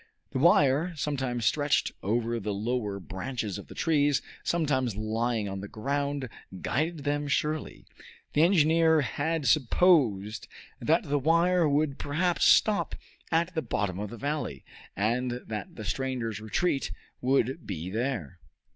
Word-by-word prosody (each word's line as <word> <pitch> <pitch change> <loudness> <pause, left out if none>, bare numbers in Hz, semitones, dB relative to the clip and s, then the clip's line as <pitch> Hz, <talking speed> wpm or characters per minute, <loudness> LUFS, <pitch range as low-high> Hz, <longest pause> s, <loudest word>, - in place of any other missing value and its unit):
The 130 - -2
wire, 165 0 +4
sometimes 130 -6 -2
stretched 145 +5 +2
over 115 +3 0
the 105 -1 -3
lower 105 -2 -2
branches 100 +2 -4
of - - -11
the - - -11
trees, 145 -3 +2 0.2
sometimes 130 - 0
lying 110 +1 -1
on 95 0 -5
the 100 - -6
ground, 140 +4 -2 0.3
guided 155 - -1
them 145 +1 -1
surely. 150 +2 -2 0.5
The 150 - +3
engineer 160 -2 +4
had 150 +4 -1
supposed 115 - +3 0.3
that - - +2
the 145 +1 0
wire 170 +3 +3
would 145 -1 +1
perhaps 170 +5 +1
stop 210 -2 +4 0.4
at 170 +2 +1
the 160 - -1
bottom 100 - -2
of 105 0 -4
the 120 - -8
valley, 145 - -3 0.3
and 120 +4 -1
that 105 -3 -6
the 110 - -7
stranger's 115 0 -2
retreat 135 - 0 0.3
would 130 +3 +1
be 90 -2 -4
there. 115 - -3
135 Hz, 140 wpm, -28 LUFS, 110-155 Hz, 0.5 s, wire